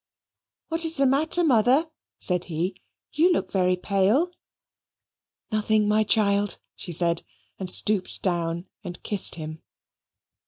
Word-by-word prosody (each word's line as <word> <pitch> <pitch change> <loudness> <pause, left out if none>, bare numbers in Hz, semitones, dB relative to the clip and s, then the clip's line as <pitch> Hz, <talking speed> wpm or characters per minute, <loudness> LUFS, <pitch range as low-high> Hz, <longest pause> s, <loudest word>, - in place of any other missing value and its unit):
"What 330 +1 +1
is 325 -1 +2
the 275 - +3
matter, 310 +6 +2
Mother?" 260 +2 +3 0.3
said 180 -1 +1
he; 175 +3 -3 0.4
"you 335 +4 +3
look - - -1
very 185 -1 +2
pale." 200 - +1 1.2
"Nothing, 215 0 +1
my 215 +1 +3
child," 205 -2 +2 0.2
she 180 - -6
said 170 0 0 0.4
and 190 -2 -5
stooped 200 0 +2
down 170 -1 -1 0.2
and 175 - -8
kissed 205 -3 0
him. 155 -1 -8
205 Hz, 125 wpm, -25 LUFS, 180-260 Hz, 1.2 s, the